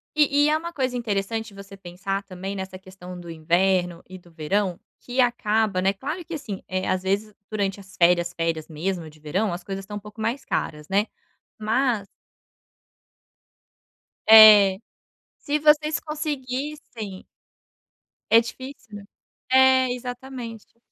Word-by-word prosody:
E 290 -1 +4
e - - +3
é 310 - +3
uma 340 +1 -7
coisa 255 -2 -1
interessante 220 -1 -2
você 200 0 -11
pensar 195 +2 -4
também 195 +1 -6
nessa 190 -1 -6
questão 185 -1 -11
do 170 -1 -10
inverno 175 +2 +1
e 185 - -9
do 175 -1 -19
verão, 175 +3 -1 0.2
que 255 +1 0
acaba, 220 -5 +1
né, 195 +1 +2
claro 305 - -5
que, 340 - -8
assim, 275 -11 -6 0.3
às 185 0 0
vezes 205 +3 -1 0.2
durante 200 -2 -1
as 195 -1 -15
férias, 175 0 +3
férias 165 -2 -2
mesmo 165 +1 -4
de 155 0 -19
verão, 175 +6 -1
as 175 0 -6
coisas 195 +1 -5
estão 205 +1 -7
um - - -5
pouco 210 +2 -13
mais 240 +5 -2
caras, 150 -1 -3
né. 200 +2 +2 0.6
Mas 225 -1 +1 2.2
É. 210 -3 +9 0.6
Se 295 0 -1
vocês 305 +1 +3
conseguissem 275 -8 -5 1.0
É 225 - +8
difícil, 255 -2 -9
né. 205 - -8 0.5
É, 260 0 +5
exatamente. 245 -3 -8
205 Hz, 140 wpm, -24 LUFS, 185-255 Hz, 2.2 s, É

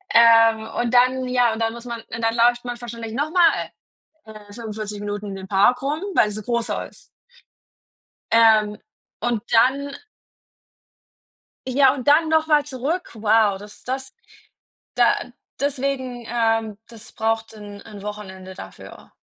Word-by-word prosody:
Ähm, 225 -1 +6
und 240 0 -1
dann 255 +1 +3
ja, 245 -2 +2
und 220 - -6
dann 225 0 0
muss 235 +1 -10
man 235 -1 -5
und 225 - -8
dann 225 0 +1
läuft 240 +1 +3
man 245 -1 -5
wahrscheinlich 230 -2 -7
noch 290 +5 -2
mal, 345 -1 +3 0.5
äh, 215 -1 -13
fünfundvierzig 215 -2 -6
Minuten 205 0 -5
in 195 - -6
dem 190 0 -8
Park 205 +6 +3
rum, 295 +4 -2
weil 210 - +4
es 210 - -5
'n - - -9
großer 235 +1 -2
ist. - - -19 1.3
Ähm, 220 -2 +4 0.4
und 240 -2 -1
dann 275 +4 +3 1.7
Ja, 265 +1 +4
und 265 -1 -5
dann 315 +3 +5
noch 315 0 +2
mal 300 -2 +3
zurück. 290 +6 -3
Wow, 215 -2 +2
das 205 +1 -13
das 265 +1 -4 0.8
da - - +4 0.5
deswegen, 265 -3 -2
ähm, 225 -3 0
das 230 -1 -12
braucht 225 0 -2
'n 205 -1 -10
'n 205 -2 -11
Wochenende 190 -3 -8
dafür. - - -12
230 Hz, 150 wpm, -22 LUFS, 215-255 Hz, 1.7 s, Ähm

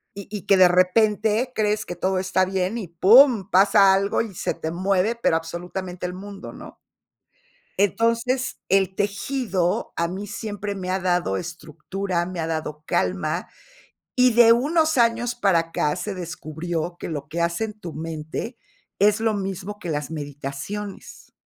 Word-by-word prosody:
y 200 -1 -8
y 205 - -5
que 195 - +5
de 185 -1 +8
repente 210 +6 +2
crees 215 -1 0
que 175 - -6
todo 185 +2 0
está 185 0 +1
bien 190 +3 -1
y 200 - -6
pum, 215 - +6
pasa 195 +1 +6
algo 195 +1 +1
y 220 -3 -5
se - - -2
te 160 - -4
mueve, 190 +5 +1
pero 235 -8 +1
absolutamente 180 +2 -5
el 180 - -6
mundo, 200 +1 -9
¿no? - - -12 1.0
Entonces 230 +6 +1
el 190 0 +2
tejido 200 -2 -1
a 170 - +1
mí 190 +4 -5
siempre 205 -1 -5
me 185 -1 -4
ha 190 +1 0
dado 175 - 0
estructura, 170 - -4
me 185 0 -6
ha 160 - -2
dado 155 -2 -4
calma, - - -1 0.7
y 250 -1 +5
de 230 0 +7
unos 315 +5 +2
años 235 0 +2
para 195 -7 +3
acá 165 -2 -1
se 195 +3 -4
descubrió 170 0 -5
que - - -5
lo 150 -2 -5
que 170 +3 -3
hace 170 +6 0
en 215 -1 -10
tu 170 -6 -7
mente 160 - -5 0.4
es 210 +2 +4
lo 225 -1 +1
mismo 195 +1 -4
que 175 - -6
las 150 -2 -2
meditaciones. 145 +7 -7
190 Hz, 160 wpm, -23 LUFS, 170-215 Hz, 1.0 s, de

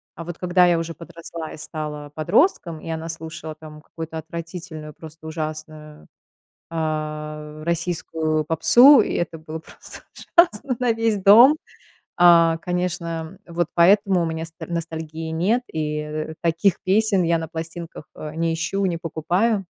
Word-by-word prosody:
А 165 - -8
вот 170 0 -6
когда 180 0 +3
я 175 -1 +3
уже 165 0 -3
подросла 165 0 -9
и - - -9
стала 150 -1 -6
подростком, 170 - +1
и - - -8
она 160 0 -4
слушала 160 -1 -7
там 155 -1 -12
какую-то 160 +1 -8
отвратительную, 165 -1 -7
просто 160 +1 -12
ужасную, 155 -1 -7 0.6
а, 155 -1 -4
российскую 160 -2 -1
попсу, 235 - +7
и - - +1
это 170 -1 -2
было 155 0 -7
просто 160 - -12 0.4
ужасно 280 - +4
на 250 -2 +2
весь 225 -1 +1
дом. 220 +9 +8 0.6
А, 170 -2 +6
конечно, 170 -2 -3
вот 170 -1 -2
поэтому 195 +1 +4
у - - +1
меня 160 0 -3
с 165 - -12
ностальгии 160 -1 -5
нет, 200 +10 +1
и, 150 -1 -3
э, 155 +1 -5
таких 170 +3 +2
песен 200 0 +2
я 170 0 +2
на 160 - -5
пластинках, 165 -1 -7
а, 155 0 -7
не 165 0 0
ищу, 195 +5 -1
не 175 -3 0
покупаю. 180 +6 0
165 Hz, 150 wpm, -22 LUFS, 155-180 Hz, 0.6 s, дом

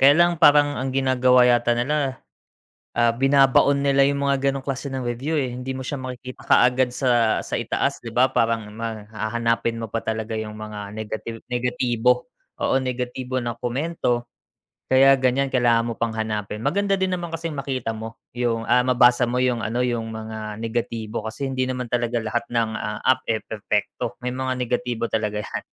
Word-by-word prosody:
kaya 140 +2 +7
lang 175 -1 +3
parang 145 -3 +5
ang 135 - -2
ginagawa 130 -1 +4
yata 120 -1 +3
nila, 135 +2 -1 0.7
ah, 120 -1 +2
binabaon 135 +1 +4
nila 140 -1 +4
yung 140 0 +1
mga 140 0 0
ganong 135 - -4
klase 135 +1 -3
ng 130 - -3
review 130 +6 -1
eh, 130 - -1
hindi 125 +2 -5
mo 130 - -6
siya 130 +2 -4
makikita 130 -1 -8
kaagad 125 0 +4
sa 120 -4 +2
sa - - -4
itaas 140 0 -1
'di 115 - -6
ba 125 +2 +4
parang 115 -4 0
ma 110 -2 -5
hahanapin 115 +1 -1
mo 115 - -4
pa 115 +2 -3
talaga 110 0 -3
yung 110 -1 -4
mga 105 -1 -7
negative 110 +1 -6
negatibo, 125 0 +1 0.3
oo - - +2
negatibo 130 0 -2
na 120 -1 -4
komento. 125 -1 -1 0.6
Kaya 135 +1 +6
ganyan 130 +1 +1
kailangan 120 -3 +2
mo - - -3
pang 115 -1 -1
hanapin, 105 -1 -3
maganda 200 - 0
din 190 - +2
naman 175 -2 -3
kasing 165 -2 -4
makita 130 -5 -3
mo 110 +1 -8 0.2
yung, 115 -2 -1
ah, 125 0 +4
mabasa 125 -1 +4
mo 125 +1 -1
yung 125 -3 +1
ano, 115 +3 -2
yung 115 -2 -1
mga 110 -1 -6
negatibo 115 -1 -3
kasi 125 +5 -4
hindi 130 -1 -1
naman 125 -1 -3
talaga 120 0 0
lahat 110 +1 -2
ng, 115 -2 0
ah, 105 0 -4
app 130 0 +2
eh, 110 -1 -1
perpekto, 105 -1 -3
may 125 - -3
mga 130 +1 -2
negatibo 120 -1 -1
talaga 105 -1 -1
'yan. 105 - -5
125 Hz, 180 wpm, -23 LUFS, 115-130 Hz, 0.7 s, kaya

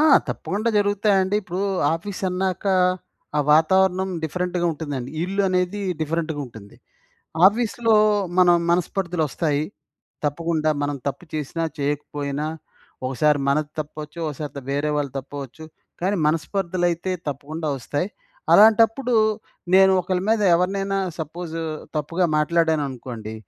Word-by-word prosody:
ఆ! - - +5 0.3
తప్పకుండా 215 +4 -2
జరుగుతాయండి. 205 -1 +2
ఇప్పుడూ 185 +1 -4 0.3
ఆఫీసన్నాక, 185 +1 -3 0.7
ఆ - - +3
వాతావరణం 190 +4 +3 0.2
డిఫరెంట్‌గ 180 +2 -2
ఉంటుందండి. 140 -5 -5
ఇల్లు 195 +2 0
అనేది 185 +2 0 0.2
డిఫరెంట్‌గ 160 0 -1
ఉంటుంది. 110 -4 -13 0.7
ఆఫీస్‌లో 225 +1 +2 0.4
మనం 175 -1 +6
మనస్పర్థలొస్తాయి 165 -4 0 0.6
తప్పకుండా. 155 +1 0
మనం 145 0 -1
తప్పు 160 - -6
చేసినా, 155 +2 -2
చేయకపోయినా. 145 0 -2 0.6
ఒకసారి 145 +3 +2
మనది 150 +1 +1
తప్పవచ్చు. 150 +2 -8
ఒకసారిద 145 -1 -6
వేరే 145 +2 0
వాళ్ళది 140 -2 -2
తప్పవచ్చు. 140 +2 -8 0.4
కానీ, 195 +3 +1
మనస్పర్థలైతే 175 +2 0 0.2
తప్పకుండా 150 +3 -4
వస్తాయి. 145 - -2 0.4
అలాంటప్పుడు, 225 +4 +5 0.6
నేను 190 0 +7
ఒకళ్ళ 180 0 -1
మీద 225 -1 +2
ఎవరినైనా 195 +2 0 0.2
సపోజూ 165 +1 -5 0.4
తప్పుగా 165 +5 0
మాట్లాడాననుకోండి, 140 -9 -1
165 Hz, 100 wpm, -23 LUFS, 145-190 Hz, 0.7 s, నేను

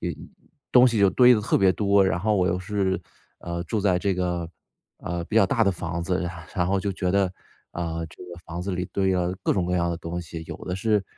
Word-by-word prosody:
有 - - -2 0.6
东 125 0 +7
西 115 -2 -1
就 100 -1 +5
堆 125 -1 +6
得 105 - 0
特 125 - +2
别 95 -1 +5
多。 100 0 +3
然 90 - +1
后 105 +4 +1
我 90 -2 +2
又 90 - 0
是， 95 0 -1 0.4
呃， 85 0 -4
住 105 +6 -2
在 95 -3 +2
这 95 0 0
个， 90 -2 -2 0.5
呃， 85 0 -4
比 105 - -7
较 100 -4 +6
大 115 - +1
的 100 - +3
房 85 -1 -4
子， 90 0 -1 0.3
然 90 -3 +1
后 95 +1 +1
就 100 0 -2
觉 90 -1 -2
得 95 -2 +2 0.4
啊 85 -1 -3
这 80 - -17
个 90 -1 -10
房 85 +2 -5
子 100 - -3
里 90 0 -2
堆 95 -1 +1
了 90 -1 0
各 - - +3
种 90 -3 0
各 90 - 0
样 85 -1 +1
的 85 - -2
东 85 +1 -5
西。 80 0 -8
有 - - -5
的 90 - -3
是 105 0 +1
90 Hz, 265 characters per minute, -25 LUFS, 85-100 Hz, 0.6 s, 东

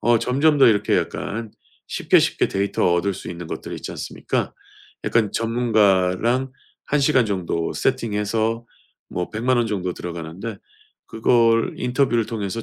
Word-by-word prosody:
어 120 -1 +4
점점 145 +6 +2
더 - - +7
이렇게 105 -3 +2
약간 110 +2 -3 0.4
쉽게, - - +3
쉽게 - - +1
데이터 95 -3 +1
얻을 90 +3 +1
수 - - -8
있는 85 -1 -7
것들이 - - -6
있지 - - -7
않습니까? - - -3 0.5
약간 110 -3 +1
전문가랑 115 +1 +2 0.4
1 150 - +1
시간 130 -3 +3
정도 90 -4 -2
세팅해서 115 -2 -1 0.5
뭐 90 - -3
1,000,000 120 +3 +1
원 120 - +2
정도 95 -4 -2
들어가는데 85 +6 -6 0.5
그걸 115 0 +2
인터뷰를 125 -2 +1
통해서 110 0 -4
110 Hz, 295 characters per minute, -22 LUFS, 95-120 Hz, 0.5 s, 더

